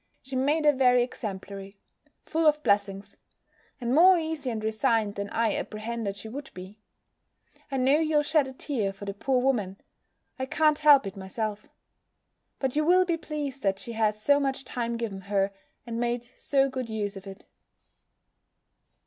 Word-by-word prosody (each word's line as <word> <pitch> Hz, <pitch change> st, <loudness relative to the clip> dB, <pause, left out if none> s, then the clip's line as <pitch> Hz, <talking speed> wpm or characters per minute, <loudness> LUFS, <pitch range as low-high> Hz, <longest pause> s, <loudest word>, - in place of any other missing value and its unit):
She 265 Hz, 0 st, -7 dB
made 295 Hz, +4 st, +1 dB
a 295 Hz, -, +6 dB
very 250 Hz, -2 st, +4 dB
exemplary 200 Hz, -4 st, -7 dB, 0.5 s
Full 325 Hz, 0 st, +1 dB
of 300 Hz, 0 st, +3 dB
blessings 200 Hz, -1 st, 0 dB, 0.6 s
And 240 Hz, -1 st, -1 dB
more 360 Hz, +5 st, +7 dB
easy 315 Hz, -5 st, -3 dB
and 220 Hz, -2 st, -4 dB
resigned, 220 Hz, -1 st, +1 dB
than 200 Hz, 0 st, -5 dB
I 225 Hz, -2 st, +1 dB
apprehended 215 Hz, -1 st, -4 dB
she 205 Hz, +2 st, -7 dB
would 270 Hz, +5 st, -7 dB
be. 185 Hz, +4 st, -10 dB, 0.9 s
I 270 Hz, -, -1 dB
know 265 Hz, +4 st, +4 dB
you'll 310 Hz, -2 st, +2 dB
shed 300 Hz, -2 st, +2 dB
a 265 Hz, -, -8 dB
tear 235 Hz, -8 st, -2 dB
for 195 Hz, +1 st, -10 dB
the 200 Hz, -, -4 dB
poor 255 Hz, +6 st, 0 dB
woman: 220 Hz, -7 st, 0 dB, 0.6 s
I 260 Hz, -, -2 dB
can't 305 Hz, +1 st, +2 dB
help 295 Hz, -4 st, +6 dB
it 195 Hz, -, -6 dB
myself. 205 Hz, +2 st, -5 dB, 0.9 s
But 265 Hz, -1 st, -2 dB
you 305 Hz, -, +2 dB
will 365 Hz, +3 st, +5 dB
be 345 Hz, -2 st, +1 dB
pleased 295 Hz, -4 st, -5 dB
that 195 Hz, -3 st, +1 dB
she 200 Hz, +4 st, -6 dB
had 215 Hz, -2 st, +1 dB
so 285 Hz, +7 st, +3 dB
much 270 Hz, -1 st, -2 dB
time 235 Hz, -1 st, -3 dB
given 210 Hz, -5 st, -4 dB
her, 200 Hz, 0 st, 0 dB, 0.3 s
and 230 Hz, -1 st, -4 dB
made 240 Hz, 0 st, -1 dB
so 275 Hz, -1 st, +1 dB
good 260 Hz, -3 st, -5 dB
use 210 Hz, -2 st, -3 dB
of 195 Hz, 0 st, -10 dB
it. 195 Hz, 0 st, -11 dB
240 Hz, 170 wpm, -27 LUFS, 205-285 Hz, 0.9 s, more